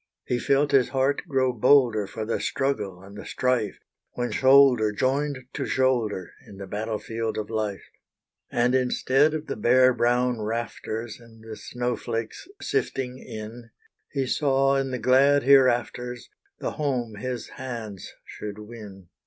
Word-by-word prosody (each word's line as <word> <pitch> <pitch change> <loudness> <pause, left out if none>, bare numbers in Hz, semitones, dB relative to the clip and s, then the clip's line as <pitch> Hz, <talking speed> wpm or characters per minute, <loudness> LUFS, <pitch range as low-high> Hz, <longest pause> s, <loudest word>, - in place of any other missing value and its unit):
He 125 - -1
felt 140 +3 +2
his 130 -3 +4
heart 135 +1 +1
grow 130 -4 +1
bolder 120 -4 +4
For 110 +3 -5
the 115 - -1
struggle 100 -10 -2
and 100 +1 -13
the - - -8
strife, 125 -5 -1 0.4
When 120 0 -2
shoulder 130 -5 +5
joined 135 +3 -1
to 140 - -3
shoulder, 120 -8 0 0.2
In 100 - -12
the 100 - -7
battle 110 +3 -3
field 115 +1 -4
of 110 0 -4
life. 105 -4 -2 0.7
And 120 +1 +2
instead 130 +3 +2
of 155 0 -4
the - - -4
bare 130 +3 +4
brown 120 0 +1
rafters, 115 0 -4
And 115 -2 -17
the 110 - -6
snowflakes 120 - -4
sifting 130 - -2
in, 115 +1 -9 0.4
He 135 -2 -1
saw 135 0 +2
in 135 -1 0
the 130 - -2
glad 140 +3 +4
hereafters, 125 -2 +2 0.3
The - - -3
home 125 -7 -2
his 125 0 -4
hands 115 -7 -7
should 105 -1 -7
win. 105 -4 -11
120 Hz, 145 wpm, -25 LUFS, 110-130 Hz, 0.7 s, shoulder